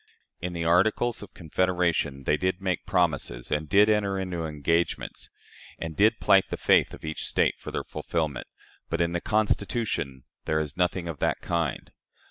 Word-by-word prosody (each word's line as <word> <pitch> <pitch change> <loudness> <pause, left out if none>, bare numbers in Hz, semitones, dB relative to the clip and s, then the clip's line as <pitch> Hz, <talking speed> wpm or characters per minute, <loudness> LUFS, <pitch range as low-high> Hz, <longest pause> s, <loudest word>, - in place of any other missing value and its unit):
In 90 0 -4
the 85 -1 -3
Articles 110 +7 +2
of 105 - -11
Confederation 85 -4 0
they 75 - +2
did 95 +3 -1
make 95 -2 -2
promises, 80 -10 0
and 75 0 -1
did 105 +5 +6
enter 105 -2 +2
into 90 -4 -3
engagements, 80 +3 -1 0.5
and 80 -1 -5
did 110 +5 +4
plight 95 -1 +5
the - - -3
faith - - +3
of - - -12
each 80 0 -3
State - - +1
for - - -7
their - - -3
fulfillment; 80 -5 -3 0.4
but 85 - -1
in 85 0 +1
the 85 0 -2
Constitution 105 - 0 0.2
there 80 - +1
is 75 -2 -3
nothing 90 -1 0
of 80 -4 -5
that - - 0
kind. 85 -5 -2
85 Hz, 170 wpm, -27 LUFS, 80-95 Hz, 0.5 s, did